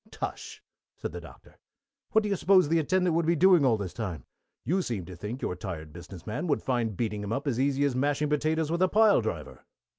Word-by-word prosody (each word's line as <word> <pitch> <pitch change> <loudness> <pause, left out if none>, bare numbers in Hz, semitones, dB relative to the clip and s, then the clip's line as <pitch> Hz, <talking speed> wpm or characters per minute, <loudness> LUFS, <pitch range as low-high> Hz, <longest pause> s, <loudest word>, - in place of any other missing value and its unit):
"Tush!" 440 -1 -6 0.4
said - - -5
the - - -7
Doctor. - - -16 0.5
"What 220 -1 +4
do 210 - -2
you 200 - +1
suppose 185 -3 +4
the 165 +1 +3
attendant 180 +2 +1
would 165 -1 +1
be 170 - +3
doing 180 -1 +5
all 120 -5 +3
this 95 -4 -5
time? 90 - -5 0.4
You 185 +4 +1
seem 110 - -4
to 90 - -9
think 105 +9 -6
your 90 - -1
tired 85 -4 -7
business 85 0 -11
man 110 +11 -3
would 145 - 0
find 115 -6 -1
beating 105 -3 -2
him 100 0 -5
up 135 +6 -2
as 125 -3 0
easy 140 +1 +1
as 140 -3 0
mashing 145 +3 0
potatoes 155 +1 0
with 170 +1 -1
a 185 - +5
pile 215 0 +5
driver." - - -5
140 Hz, 230 wpm, -28 LUFS, 105-170 Hz, 0.5 s, doing